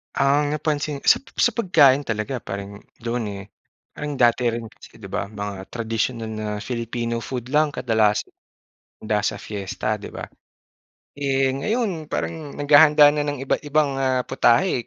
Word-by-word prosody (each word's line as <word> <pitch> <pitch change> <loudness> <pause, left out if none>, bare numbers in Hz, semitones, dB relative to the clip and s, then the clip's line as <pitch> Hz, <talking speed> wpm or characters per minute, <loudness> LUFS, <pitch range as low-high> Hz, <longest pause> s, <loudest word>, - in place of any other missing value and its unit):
Ang 145 +2 +2
napansin 150 -1 -2
sa - - +5 0.2
sa 240 - +3
pagkain 155 - +4
talaga 115 +4 -2
parang 100 -2 -7 0.2
doon, 120 0 -2
eh, 100 - -7 0.5
parang 150 0 -4
dati 120 -2 +3
rin 115 -1 -1
kasi 115 - -17
'di 100 - -9
ba 100 - -2
mga 100 -2 -6
tradisyonal 115 0 -2
na 110 -1 -4
Filipino 115 0 -3
food 125 +1 -5
lang 150 0 +2
kadalasan 110 -4 +1 0.7
handa 105 -1 0
sa - - -2
fiesta, 105 +1 -3
'di 105 - -10
ba? - - -7 1.0
Eh, 135 -1 +1
ngayon 175 - -2
parang 155 -2 -4
naghahanda 145 0 +6
na 150 0 -1
ng 145 -2 -3
iba't-ibang, 145 0 0
ah, 130 -1 +1
putahe, 120 +2 +2
130 Hz, 145 wpm, -23 LUFS, 110-145 Hz, 1.0 s, naghahanda